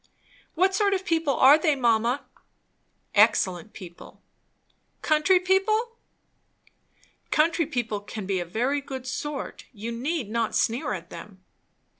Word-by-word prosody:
"What 375 +3 +2
sort 400 0 +2
of 380 0 -4
people 325 -5 0
are 275 +5 +7
they, 310 -3 +2
mamma?" 240 +2 +1 0.9
"Excellent 185 +2 +2
people." 175 -4 -12 0.8
"Country 310 +4 +3
people! 430 +6 +1 0.6
" - - -36
"Country 330 0 +2
people 240 -8 -2
can 205 0 -8
be 190 -1 -1
a 175 - -3
very 245 +11 -1
good 265 -2 -7
sort. 275 +2 -5
You 230 0 -6
need 260 +2 -3
not 230 -1 -1
sneer 230 -1 0
at 170 -3 -8
them." 185 +2 -11
260 Hz, 130 wpm, -25 LUFS, 220-330 Hz, 0.9 s, are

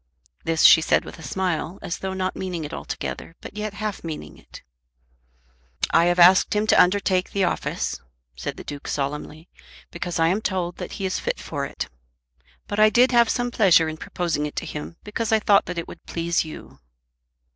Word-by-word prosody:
This 165 -1 +1
she 160 - +9
said - - +2
with - - -10
a - - -10
smile, 175 +3 -2
as 170 - -4
though 190 0 -4
not 185 0 -2
meaning 180 -4 -4
it 150 - -8
altogether, 165 - -6
but - - -10
yet 210 -1 -4
half 215 -1 -4
meaning 160 -2 -6
it. - - -14 1.3
"I 165 - +5
have 175 0 +2
asked 180 +4 +6
him 210 +1 +2
to - - +6
undertake 185 0 +2
the 200 - 0
office," - - -2 0.3
said 65 - -5
the - - -8
Duke 145 -1 -8
solemnly, 150 +3 -4 0.4
"because 175 0 -4
I 165 0 +3
am 195 +5 0
told 180 -4 -2
that - - -6
he 195 - -4
is 185 - -1
fit - - -2
for 140 -3 -4
it. - - -5 0.8
But 205 - -3
I 215 0 +7
did 245 +4 +4
have 235 -2 +5
some 245 0 0
pleasure 180 -8 +5
in 155 0 -5
proposing 160 -3 -2
it 150 - -10
to - - -3
him 150 +3 -7
because 220 +1 -3
I 220 - +5
thought 205 -2 +4
that 180 - -5
it 170 - -3
would - - -11
please 170 0 0
you." 155 - -11
180 Hz, 200 wpm, -23 LUFS, 165-205 Hz, 1.3 s, she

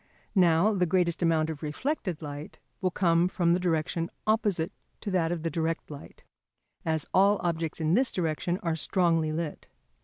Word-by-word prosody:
Now, 180 +1 +4
the 180 -3 +1
greatest 175 0 +1
amount 160 -2 +2
of 150 - -8
reflected 170 - -3
light 145 +1 -7 0.2
will 185 - +2
come 170 -1 +3
from 175 -2 +2
the 180 - +2
direction 165 -1 -1 0.2
opposite 210 -7 +1 0.3
to 205 - -4
that 170 -3 +1
of 170 -2 -3
the 165 - -1
direct 165 -1 -2
light, 145 - -11 0.6
as 160 -2 0
all 200 +2 +5
objects 165 -2 -1
in 160 0 +1
this 250 +5 +3
direction 175 0 -1
are 165 -2 0
strongly 165 -2 +2
lit. 155 -1 -4
170 Hz, 165 wpm, -28 LUFS, 160-185 Hz, 0.6 s, all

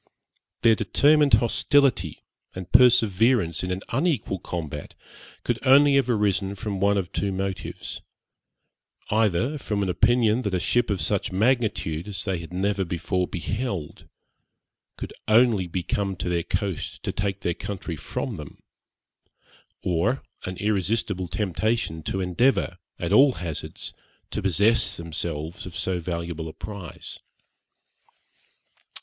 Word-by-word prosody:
Their 115 -1 +7
determined 145 +8 +4
hostility 120 - +2 0.3
and 95 -1 -7
perseverance 115 -7 +4
in 90 - -2
an 90 +1 -3
unequal 130 - 0
combat 80 -5 -6 0.5
could 120 -2 -1
only 140 +2 +6
have 135 -2 +3
arisen 100 -3 +1
from 100 -2 -4
one 100 +1 +3
of 95 -1 -2
two 100 0 -1
motives 95 -2 -4 1.1
either 110 - +1
from 105 -5 -1
an 95 - -1
opinion 120 +4 +3
that 100 -6 -1
a - - +1
ship 120 +6 +1
of 100 -3 -1
such 100 -2 -1
magnitude, 105 -6 0
as 100 -2 -5
they 95 -4 -1
had 85 -1 -9
never 100 +2 0
before 90 +1 -1
beheld, 100 - -4 0.9
could - - -6
only 110 -4 +4
be 90 +1 -3
come 100 +2 -1
to 90 - -4
their 85 -1 +1
coast 95 +1 -3
to - - -1
take 100 -1 -2
their 85 - 0
country 90 -2 -5
from 100 - -4
them; 75 -2 -9 1.3
or 90 +9 0 0.2
an 95 0 -5
irresistible 100 -1 0
temptation 100 -1 -1
to 95 +5 -2
endeavour, 90 0 +1 0.2
at 85 +2 -2
all 135 +4 +7
hazards, 85 -5 -6 0.4
to - - -2
possess 100 +2 +3
themselves 85 +1 -4
of 90 - -9
so 95 -1 -1
valuable 85 -1 -4
a 80 - -8
prize. 100 -4 -8
100 Hz, 130 wpm, -25 LUFS, 90-115 Hz, 1.3 s, Their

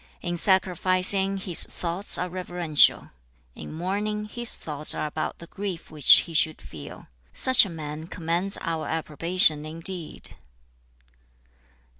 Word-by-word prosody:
In 175 -1 -4
sacrificing, 190 +1 +2
his 185 -3 +4
thoughts 180 +4 -4
are 180 - -3
reverential. 175 -4 +1 0.4
In - - -11
mourning, 205 +6 -4
his 240 +2 +3
thoughts 150 -1 -2
are - - -4
about 155 +1 -5
the 170 - -12
grief 190 -2 -8
which 150 -4 +6
he 170 - -11
should 155 0 +1
feel. 75 -3 -12 0.3
Such 260 -5 +4
a - - -9
man 155 -1 -8
commands 175 +4 -3
our 165 -1 -4
approbation 160 0 +2
indeed.' 165 +2 -6
175 Hz, 125 wpm, -24 LUFS, 160-190 Hz, 0.4 s, which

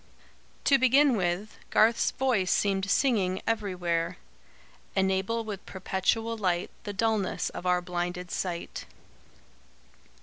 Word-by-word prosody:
To 275 -1 +5
begin 265 +1 +5
with, 190 +2 -2
Garth's 225 +1 +4
voice 235 -9 +1
seemed 195 -1 +1
singing 195 -8 +2
everywhere: 180 -6 -1 0.8
"Enable 190 +4 +1
with 205 -3 -6
perpetual 195 +5 -1
light 180 -5 -1
The 205 - -4
dulness 215 -2 0
of 180 - -5
our 180 0 +2
blinded 180 0 -3
sight." 175 -2 -4
195 Hz, 105 wpm, -28 LUFS, 180-225 Hz, 0.8 s, To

